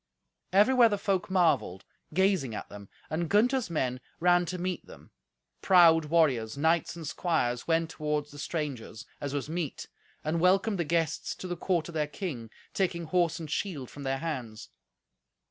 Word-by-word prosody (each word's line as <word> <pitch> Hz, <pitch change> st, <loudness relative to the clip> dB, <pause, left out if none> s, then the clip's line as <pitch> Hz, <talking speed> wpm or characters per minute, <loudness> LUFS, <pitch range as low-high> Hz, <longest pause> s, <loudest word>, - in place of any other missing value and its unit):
Everywhere 230 Hz, +5 st, +6 dB
the 205 Hz, -, 0 dB
folk 195 Hz, -2 st, -1 dB
marvelled, 165 Hz, -, +1 dB, 0.3 s
gazing 185 Hz, -, +1 dB
at -, -, -6 dB
them, 100 Hz, -1 st, -11 dB, 0.2 s
and 160 Hz, +1 st, -1 dB
Gunther's 240 Hz, +2 st, +2 dB
men 130 Hz, -6 st, -1 dB, 0.2 s
ran 175 Hz, 0 st, +3 dB
to 180 Hz, +2 st, -3 dB
meet 180 Hz, +1 st, -3 dB
them; -, -, -14 dB, 0.5 s
proud 170 Hz, -4 st, +6 dB
warriors, 140 Hz, -8 st, +2 dB
knights 160 Hz, +3 st, +1 dB
and 165 Hz, -3 st, -7 dB
squires, 145 Hz, -8 st, -1 dB
went 165 Hz, 0 st, +1 dB
toward 150 Hz, -2 st, -2 dB
the 145 Hz, -, -11 dB
strangers, 140 Hz, -9 st, -4 dB
as 145 Hz, -1 st, -4 dB
was 145 Hz, -, -2 dB
meet, 160 Hz, -2 st, -4 dB, 0.3 s
and 160 Hz, +2 st, -1 dB
welcomed 195 Hz, +2 st, +3 dB
the 170 Hz, -, 0 dB
guests 165 Hz, 0 st, -1 dB
to 185 Hz, -, -7 dB
the 175 Hz, -, -3 dB
court 170 Hz, -2 st, -1 dB
of -, -, -9 dB
their 155 Hz, -2 st, 0 dB
king, 145 Hz, -, -5 dB, 0.2 s
taking 175 Hz, -3 st, 0 dB
horse 165 Hz, 0 st, +1 dB
and 155 Hz, -3 st, -7 dB
shield 150 Hz, -, -3 dB
from 145 Hz, -, -10 dB
their 135 Hz, -1 st, -1 dB
hands. 130 Hz, -8 st, -5 dB
165 Hz, 165 wpm, -29 LUFS, 145-180 Hz, 0.5 s, Everywhere